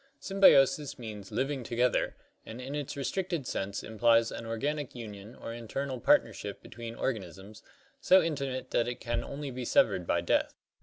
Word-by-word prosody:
Symbiosis 150 Hz, -7 st, +4 dB
means 105 Hz, -4 st, -8 dB
living 130 Hz, +4 st, -1 dB
together 120 Hz, +2 st, +1 dB, 0.3 s
and 115 Hz, +2 st, -9 dB
in 130 Hz, +2 st, -6 dB
its 145 Hz, -1 st, -4 dB
restricted 170 Hz, +1 st, -2 dB
sense 100 Hz, -2 st, -3 dB
implies 115 Hz, +1 st, +3 dB
an 115 Hz, -, -6 dB
organic 140 Hz, +5 st, -2 dB
union 105 Hz, -1 st, -8 dB
or 115 Hz, -, -7 dB
internal 130 Hz, +3 st, -4 dB
partnership -, -, +2 dB
between 115 Hz, 0 st, -8 dB
organisms, 100 Hz, -3 st, -4 dB, 0.4 s
so 185 Hz, -, +6 dB
intimate 140 Hz, -6 st, -2 dB
that 120 Hz, -, +2 dB
it 120 Hz, -, -4 dB
can 120 Hz, -, -2 dB
only 140 Hz, 0 st, -5 dB
be 125 Hz, 0 st, -5 dB
severed 95 Hz, -6 st, +3 dB
by 85 Hz, -, +2 dB
death. 85 Hz, -, +1 dB
120 Hz, 155 wpm, -30 LUFS, 110-140 Hz, 0.4 s, so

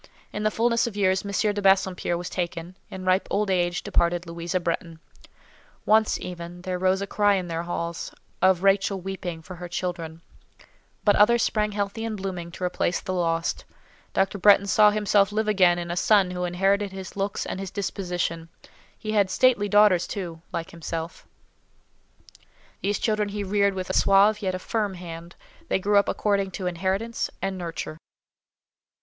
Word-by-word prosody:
In 210 Hz, -, -3 dB
the 215 Hz, -, +2 dB
fulness 235 Hz, +2 st, +1 dB
of 210 Hz, -3 st, -6 dB
years, 190 Hz, -2 st, +2 dB
M. 205 Hz, +1 st, 0 dB
de 205 Hz, -, -3 dB
Bassompierre 190 Hz, -3 st, +2 dB
was 175 Hz, 0 st, -5 dB
taken: 175 Hz, 0 st, -4 dB
in 185 Hz, -1 st, -7 dB
ripe 185 Hz, +1 st, +2 dB
old 205 Hz, -1 st, 0 dB
age 175 Hz, -1 st, 0 dB
departed 175 Hz, 0 st, +1 dB
Louisa 170 Hz, +1 st, -3 dB
Bretton. 170 Hz, -1 st, -3 dB, 0.9 s
Once 220 Hz, 0 st, +3 dB
even 175 Hz, 0 st, -8 dB
there 180 Hz, -1 st, -3 dB
rose 190 Hz, +1 st, +2 dB
a -, -, -2 dB
cry 205 Hz, 0 st, +2 dB
in 180 Hz, -2 st, -3 dB
their 165 Hz, 0 st, -2 dB
halls, 170 Hz, -1 st, -4 dB, 0.3 s
of 185 Hz, 0 st, +4 dB
Rachel 195 Hz, 0 st, +2 dB
weeping 180 Hz, -3 st, -6 dB
for 180 Hz, +2 st, -10 dB
her 175 Hz, +1 st, -7 dB
children; 170 Hz, -2 st, -5 dB, 0.8 s
but 205 Hz, -, +4 dB
others 235 Hz, +3 st, +5 dB
sprang 210 Hz, -1 st, 0 dB
healthy 205 Hz, +2 st, -3 dB
and 225 Hz, -2 st, -3 dB
blooming 185 Hz, -3 st, -5 dB
to 185 Hz, -, -7 dB
replace 180 Hz, -1 st, 0 dB
the 185 Hz, -, -4 dB
lost: 170 Hz, -2 st, -1 dB, 0.5 s
Dr. 195 Hz, +1 st, 0 dB
Bretton 200 Hz, +1 st, +6 dB
saw 210 Hz, +2 st, +5 dB
himself 210 Hz, -1 st, +2 dB
live 215 Hz, +1 st, -1 dB
again 185 Hz, -4 st, +4 dB
in 170 Hz, 0 st, -4 dB
a -, -, -2 dB
son 195 Hz, 0 st, +3 dB
who 180 Hz, 0 st, -2 dB
inherited 195 Hz, +3 st, +1 dB
his 190 Hz, -1 st, -8 dB
looks 200 Hz, 0 st, -2 dB
and -, -, -4 dB
his 195 Hz, -1 st, -5 dB
disposition; 175 Hz, -4 st, -3 dB, 0.5 s
he 215 Hz, -, -5 dB
had 205 Hz, -3 st, +3 dB
stately 210 Hz, 0 st, +3 dB
daughters, 205 Hz, -3 st, +5 dB
too, 170 Hz, -5 st, -6 dB
like 165 Hz, -, -4 dB
himself: 165 Hz, 0 st, -6 dB, 1.5 s
these 205 Hz, +1 st, 0 dB
children 215 Hz, -2 st, 0 dB
he 205 Hz, 0 st, -4 dB
reared 200 Hz, 0 st, +1 dB
with 185 Hz, -1 st, -4 dB
a -, -, -3 dB
suave, 205 Hz, +2 st, +4 dB
yet 185 Hz, -2 st, -1 dB
a -, -, -2 dB
firm 205 Hz, 0 st, -2 dB
hand; 170 Hz, -1 st, -9 dB, 0.3 s
they -, -, +1 dB
grew 205 Hz, +2 st, +2 dB
up 200 Hz, -, 0 dB
according 200 Hz, -2 st, 0 dB
to 185 Hz, 0 st, -6 dB
inheritance 190 Hz, +6 st, -1 dB
and 195 Hz, 0 st, -2 dB
nurture. 165 Hz, -3 st, -6 dB
190 Hz, 175 wpm, -25 LUFS, 175-205 Hz, 1.5 s, Bretton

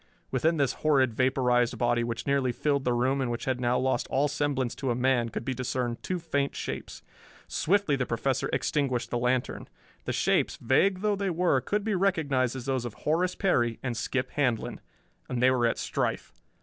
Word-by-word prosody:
Within 160 Hz, +6 st, +1 dB
this 140 Hz, -3 st, +1 dB
horrid 135 Hz, -6 st, +3 dB
vaporized 125 Hz, -1 st, +2 dB
body, 120 Hz, 0 st, +1 dB
which 115 Hz, -1 st, -4 dB
nearly 140 Hz, -3 st, +1 dB
filled 140 Hz, +2 st, 0 dB
the 125 Hz, -, +2 dB
room 130 Hz, +3 st, +1 dB
and 130 Hz, -, -1 dB
which 120 Hz, 0 st, -3 dB
had 130 Hz, -1 st, -1 dB
now 125 Hz, 0 st, +2 dB
lost 130 Hz, 0 st, 0 dB
all 140 Hz, +2 st, +2 dB
semblance 145 Hz, -4 st, -1 dB
to 135 Hz, -1 st, -3 dB
a 120 Hz, -, +1 dB
man, 125 Hz, -2 st, +2 dB
could 115 Hz, -, -5 dB
be 130 Hz, -, -1 dB
discerned 125 Hz, -1 st, -2 dB
two 185 Hz, -, -2 dB
faint 145 Hz, -5 st, -1 dB
shapes. -, -, -6 dB, 0.4 s
Swiftly 195 Hz, -4 st, +1 dB
the 125 Hz, -2 st, -2 dB
Professor 130 Hz, +3 st, -1 dB
extinguished 130 Hz, -5 st, -1 dB
the 120 Hz, -, 0 dB
lantern. 125 Hz, +1 st, -1 dB, 0.4 s
The -, -, -2 dB
shapes, -, -, +1 dB
vague 185 Hz, +10 st, +2 dB
though 210 Hz, -1 st, +2 dB
they 200 Hz, 0 st, -1 dB
were, 170 Hz, -6 st, +2 dB
could 210 Hz, +8 st, -1 dB
be 220 Hz, 0 st, -1 dB
recognized 145 Hz, -10 st, +1 dB
as 130 Hz, -2 st, -6 dB
those 130 Hz, -3 st, -1 dB
of 120 Hz, -3 st, -6 dB
Horace 175 Hz, +4 st, 0 dB
Perry 120 Hz, -, +1 dB
and 125 Hz, -3 st, -2 dB
Skip 125 Hz, +2 st, -2 dB
Handlon. 125 Hz, -6 st, -1 dB, 0.5 s
And 125 Hz, -, -2 dB
they 130 Hz, +1 st, +5 dB
were 120 Hz, -2 st, +2 dB
at 115 Hz, -, -1 dB
strife! -, -, -2 dB
130 Hz, 195 wpm, -28 LUFS, 120-145 Hz, 0.5 s, they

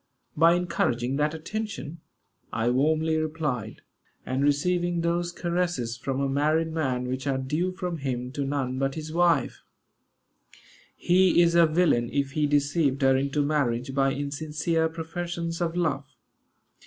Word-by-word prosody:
"By 165 Hz, +2 st, +5 dB
encouraging 135 Hz, -7 st, 0 dB
that 150 Hz, +2 st, 0 dB
attention," 170 Hz, -2 st, -5 dB, 0.5 s
I 115 Hz, +2 st, 0 dB
warmly 155 Hz, +4 st, +2 dB
replied, 150 Hz, -8 st, -3 dB, 0.4 s
"and 130 Hz, +2 st, -1 dB
receiving 175 Hz, +4 st, +1 dB
those 170 Hz, +1 st, 0 dB
caresses, 175 Hz, -10 st, -2 dB
from 135 Hz, +2 st, -3 dB
a 140 Hz, -, +1 dB
married 155 Hz, +4 st, +1 dB
man 130 Hz, -6 st, -1 dB
which 130 Hz, +2 st, -3 dB
are 135 Hz, -1 st, +1 dB
due 150 Hz, +8 st, -1 dB
from 180 Hz, -2 st, -4 dB
him 125 Hz, -2 st, -3 dB
to 140 Hz, +1 st, -3 dB
none 135 Hz, -2 st, -2 dB
but 135 Hz, 0 st, -1 dB
his 155 Hz, 0 st, -6 dB
wife. 175 Hz, 0 st, +2 dB, 1.3 s
He 180 Hz, 0 st, +3 dB
is 170 Hz, -1 st, +5 dB
a 170 Hz, -1 st, +6 dB
villain 155 Hz, -8 st, +2 dB
if 140 Hz, -1 st, -1 dB
he 150 Hz, +1 st, +1 dB
deceived 145 Hz, -1 st, +1 dB
her 135 Hz, 0 st, +5 dB
into 140 Hz, +2 st, 0 dB
marriage 135 Hz, -4 st, 0 dB
by 135 Hz, 0 st, +2 dB
insincere 155 Hz, +3 st, -1 dB
professions 170 Hz, +1 st, -4 dB
of 170 Hz, -1 st, -1 dB
love. 150 Hz, -5 st, -1 dB
150 Hz, 140 wpm, -26 LUFS, 135-170 Hz, 1.3 s, a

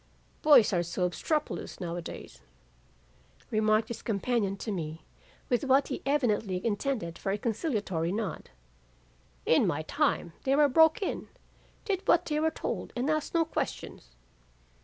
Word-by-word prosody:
"'Boys 275 Hz, -9 st, +6 dB
are 175 Hz, -, +2 dB
so 175 Hz, +2 st, -1 dB
obstropolous 300 Hz, -, -3 dB
now 170 Hz, -2 st, -4 dB
a 175 Hz, -, -4 dB
days,' -, -, -9 dB, 1.1 s
remarked 215 Hz, 0 st, +2 dB
his 235 Hz, -, -6 dB
companion 205 Hz, -2 st, -1 dB
to 215 Hz, -, -4 dB
me 160 Hz, -4 st, -5 dB, 0.4 s
with 245 Hz, +1 st, +1 dB
what 270 Hz, +1 st, +3 dB
he 265 Hz, -, -4 dB
evidently 220 Hz, -9 st, +1 dB
intended 215 Hz, -6 st, -2 dB
for 195 Hz, -, -2 dB
a 200 Hz, -, 0 dB
conciliatory 205 Hz, -, -1 dB
nod. 210 Hz, 0 st, -4 dB, 1.0 s
'In -, -, +4 dB
my -, -, -1 dB
time 170 Hz, -, 0 dB
they 270 Hz, +1 st, +2 dB
were 295 Hz, 0 st, +5 dB
broke 320 Hz, +7 st, +4 dB
in, -, -, -3 dB, 0.6 s
did 390 Hz, -3 st, -1 dB
what 345 Hz, +1 st, +4 dB
they 300 Hz, -1 st, -1 dB
were 320 Hz, +1 st, +2 dB
told 320 Hz, -, -4 dB
and 255 Hz, +5 st, 0 dB
asked 310 Hz, +1 st, -2 dB
no 330 Hz, -1 st, +4 dB
questions. -, -, -5 dB
225 Hz, 150 wpm, -29 LUFS, 190-295 Hz, 1.1 s, Boys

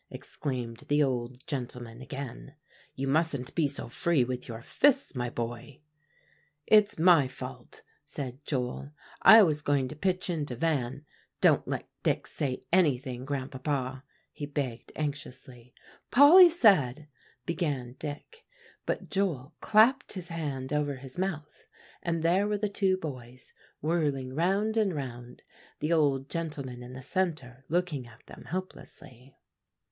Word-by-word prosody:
exclaimed 120 Hz, -5 st, -5 dB
the 145 Hz, +1 st, +3 dB
old 125 Hz, -1 st, -3 dB
gentleman 125 Hz, -3 st, -6 dB
again. 135 Hz, +1 st, -7 dB, 0.4 s
"You 135 Hz, +1 st, -3 dB
mustn't 140 Hz, -3 st, 0 dB
be 160 Hz, -4 st, +2 dB
so 140 Hz, -, -4 dB
free 145 Hz, +4 st, +1 dB
with 125 Hz, 0 st, -4 dB
your 115 Hz, -1 st, -7 dB
fists, 280 Hz, -, +2 dB
my 120 Hz, -2 st, -2 dB
boy." 120 Hz, +5 st, -6 dB, 0.8 s
"It's 210 Hz, -1 st, +5 dB
my 165 Hz, -4 st, +6 dB
fault," -, -, -10 dB, 0.2 s
said 135 Hz, 0 st, -7 dB
Joel; 135 Hz, +1 st, -3 dB, 0.3 s
"I 220 Hz, 0 st, +10 dB
was 150 Hz, -5 st, +1 dB
going 145 Hz, -3 st, +1 dB
to 155 Hz, -, -8 dB
pitch 185 Hz, +3 st, -1 dB
into 150 Hz, -7 st, -2 dB
Van. 140 Hz, -1 st, -1 dB, 0.3 s
Don't -, -, +4 dB
let -, -, -3 dB
Dick -, -, 0 dB
say 130 Hz, -3 st, -3 dB
anything, 130 Hz, -7 st, +2 dB
Grandpapa," 135 Hz, -1 st, -3 dB, 0.3 s
he 145 Hz, -, -6 dB
begged 140 Hz, -5 st, -4 dB
anxiously. 130 Hz, -5 st, -6 dB, 0.4 s
"Polly 340 Hz, +7 st, +9 dB
said" 155 Hz, -, +3 dB, 0.4 s
began 145 Hz, -8 st, -2 dB
Dick; 155 Hz, -, -7 dB, 0.4 s
but -, -, -2 dB
Joel 165 Hz, -8 st, -1 dB
clapped 225 Hz, +6 st, +4 dB
his 185 Hz, -3 st, -7 dB
hand 145 Hz, -5 st, -4 dB
over 145 Hz, -1 st, 0 dB
his 130 Hz, +4 st, -9 dB
mouth 160 Hz, -6 st, -4 dB, 0.3 s
and 165 Hz, -2 st, -2 dB
there 185 Hz, +5 st, +3 dB
were 210 Hz, 0 st, 0 dB
the 210 Hz, 0 st, -1 dB
two 195 Hz, -2 st, +1 dB
boys 130 Hz, -7 st, -8 dB, 0.3 s
whirling 145 Hz, -5 st, 0 dB
round 195 Hz, +8 st, +1 dB
and 200 Hz, -6 st, +2 dB
round, 125 Hz, -3 st, -7 dB, 0.3 s
the 155 Hz, +3 st, 0 dB
old 140 Hz, -4 st, +2 dB
gentleman 140 Hz, -7 st, -5 dB
in 125 Hz, +1 st, -9 dB
the 130 Hz, +1 st, -8 dB
centre 135 Hz, -9 st, -2 dB
looking 165 Hz, -6 st, -1 dB
at 115 Hz, +1 st, -18 dB
them -, -, -13 dB
helplessly. 135 Hz, -8 st, -8 dB
145 Hz, 135 wpm, -29 LUFS, 130-170 Hz, 0.8 s, I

